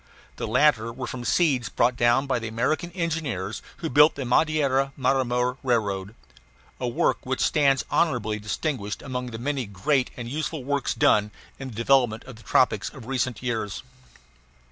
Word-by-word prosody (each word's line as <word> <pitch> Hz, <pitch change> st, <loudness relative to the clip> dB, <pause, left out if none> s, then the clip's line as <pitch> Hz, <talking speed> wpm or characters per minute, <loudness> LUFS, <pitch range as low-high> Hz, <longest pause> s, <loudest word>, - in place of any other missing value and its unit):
The -, -, -3 dB
latter 115 Hz, -1 st, +3 dB
were 130 Hz, +2 st, -6 dB
from 125 Hz, -1 st, -6 dB
seeds 135 Hz, -4 st, +2 dB
brought 120 Hz, +1 st, +2 dB
down 120 Hz, +3 st, +3 dB
by 130 Hz, -3 st, 0 dB
the 115 Hz, -, -5 dB
American 135 Hz, +9 st, -1 dB
engineers 150 Hz, -, -3 dB, 0.2 s
who 165 Hz, -, -4 dB
built 150 Hz, 0 st, +5 dB
the 135 Hz, -, -4 dB
Madeira 135 Hz, 0 st, +2 dB
Marmore 125 Hz, -1 st, +1 dB
Railroad 105 Hz, -5 st, -1 dB, 0.6 s
a 125 Hz, -, -2 dB
work 120 Hz, -, 0 dB
which 130 Hz, 0 st, -2 dB
stands 140 Hz, -3 st, +2 dB
honorably 115 Hz, -10 st, +1 dB
distinguished 105 Hz, 0 st, -3 dB
among 125 Hz, -2 st, -4 dB
the 115 Hz, -2 st, -6 dB
many 135 Hz, 0 st, -2 dB
great 125 Hz, +7 st, 0 dB
and 120 Hz, -2 st, -5 dB
useful 150 Hz, +2 st, -3 dB
works 140 Hz, 0 st, -1 dB
done 105 Hz, 0 st, +3 dB, 0.3 s
in 135 Hz, -, -6 dB
the 120 Hz, -, -9 dB
development 115 Hz, -1 st, +2 dB
of 125 Hz, -4 st, -11 dB
the -, -, -15 dB
tropics 110 Hz, -3 st, +2 dB
of 130 Hz, -6 st, -12 dB
recent 130 Hz, -2 st, -2 dB
years. 110 Hz, -5 st, -3 dB
125 Hz, 165 wpm, -25 LUFS, 115-140 Hz, 0.6 s, built